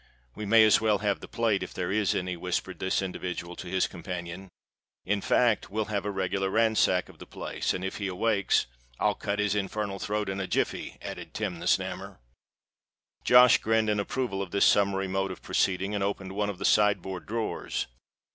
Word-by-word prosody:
"We 105 - -6
may 115 +2 +7
as 110 - +5
well 110 -2 +3
have 100 0 0
the - - -10
plate, 115 -4 0
if - - -6
there 90 -1 -2
is 105 -1 +1
any," 90 -1 -2
whispered 90 +1 -3
this 95 +1 0
individual 90 -2 -5
to 90 - -7
his 95 +1 +1
companion. 90 +1 -6 0.6
"In 100 +1 0
fact, 120 0 +2
we'll 110 +1 -3
have 100 -1 -1
a - - -1
regular 95 0 -1
ransack 110 -4 +2
of - - -16
the - - -11
place; - - -3
and 90 - -3
if 95 - -4
he 100 - -2
awakes——" 100 +1 +1 0.3
"I'll - - +3
cut 100 0 -3
his 105 -1 +1
infernal 100 0 -2
throat 105 +1 -2
in 95 0 -3
a 95 - -2
jiffey," - - -2
added - - -7
Tim 100 -6 -3
the - - -5
Snammer. - - -1 1.1
Josh 125 0 +7
grinned 110 -1 +2
an 105 - 0
approval 100 -2 -2
of 95 - -4
this 100 - +3
summary 100 -1 +3
mode 95 +1 -1
of 95 - -8
proceeding, 95 +2 0
and 100 -1 -1
opened 100 -1 -3
one 105 +1 -1
of 100 - -5
the 95 - -4
side 105 -1 +4
board 95 -2 -6
drawers. 115 +1 -2
100 Hz, 200 wpm, -28 LUFS, 95-105 Hz, 1.1 s, may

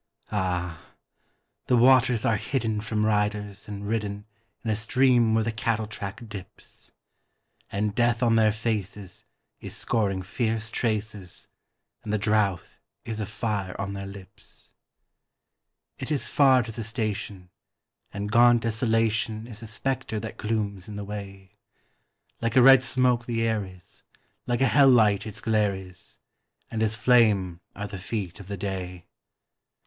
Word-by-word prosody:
Ah! 90 -4 -3 0.7
the 125 - +4
waters 125 -1 +5
are 115 -3 +3
hidden 110 -1 -1
from 105 0 -1
riders 105 -1 -1
and 100 -1 -6
ridden 105 -2 -2 0.4
In 115 - -1
a - - +1
stream 120 0 +3
where 110 - +3
the 115 - -1
cattle 110 -1 -1
track 110 +2 -7
dips; 100 -3 -10 0.8
And 105 +1 -1
Death 120 +1 +2
on 115 -1 +4
their 110 -1 +5
faces 105 -4 -3 0.3
is - - -4
scoring 100 -5 0
fierce 110 +1 -2
traces, 105 -6 -3 0.5
And 105 - -4
the 105 - +2
drouth 105 -3 0 0.3
is 110 -2 -4
a 105 - -3
fire 105 -3 -3
on 100 0 -3
their 100 0 -5
lips. 100 -1 -14 1.3
It - - -5
is 145 - 0
far 130 -3 +5
to 115 - -7
the 115 +1 -5
station, 105 -4 -3 0.6
and 105 +1 -4
gaunt 120 0 +6
Desolation 115 -1 0
Is 115 -2 -10
a 115 - -7
spectre 125 0 -2
that 110 +1 -7
glooms 105 -4 -2
in 105 - -7
the 100 0 -5
way; 100 -2 -9 0.8
Like 115 0 -1
a 130 - +7
red 135 0 +9
smoke 125 -1 +2
the 115 -1 0
air 110 -2 +1
is, 95 -2 -13 0.5
like 120 +1 0
a 135 - +5
hell 140 +1 +6
light 110 -4 +4
its 110 0 -7
glare 105 -3 +2
is, 90 -2 -9 0.5
And 110 - -2
as 110 0 +1
flame 105 -7 +3
are 105 - -4
the 100 -2 -7
feet 95 -2 -4
of 100 - -11
the 100 0 -5
day. 90 -2 -5
110 Hz, 150 wpm, -26 LUFS, 100-115 Hz, 1.3 s, red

